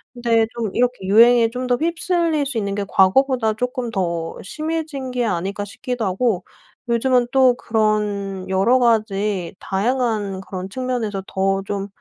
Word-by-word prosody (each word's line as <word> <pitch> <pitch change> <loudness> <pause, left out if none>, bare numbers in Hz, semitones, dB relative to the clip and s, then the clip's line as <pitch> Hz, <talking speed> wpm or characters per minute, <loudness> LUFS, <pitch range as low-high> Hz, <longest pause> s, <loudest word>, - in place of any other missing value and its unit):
근데 230 -2 +2
좀 225 -4 -3
이렇게 245 -4 0
유행에 230 +3 +6
좀 250 +2 -4
더 250 - +3
휩쓸릴 335 0 0
수 270 -3 -2
있는 200 -2 -2
게 200 -1 -2
과거보다 225 +4 +3
쪼끔 250 +1 -3
더 170 -5 -2
심해진 310 - -4
게 245 -1 -1
아닐까 195 +1 -2
싶기도 235 +2 -4
하고 190 0 0 0.5
요즘은 245 +1 +2
또 260 -2 +5
그런 210 -4 -1
여러 195 +7 +3
가지 210 -6 0
다양한 210 -2 -1
그런 190 -1 -7
측면에서 230 -4 -3
더 195 0 0
좀 200 0 -3
225 Hz, 290 characters per minute, -21 LUFS, 195-250 Hz, 0.5 s, 유행에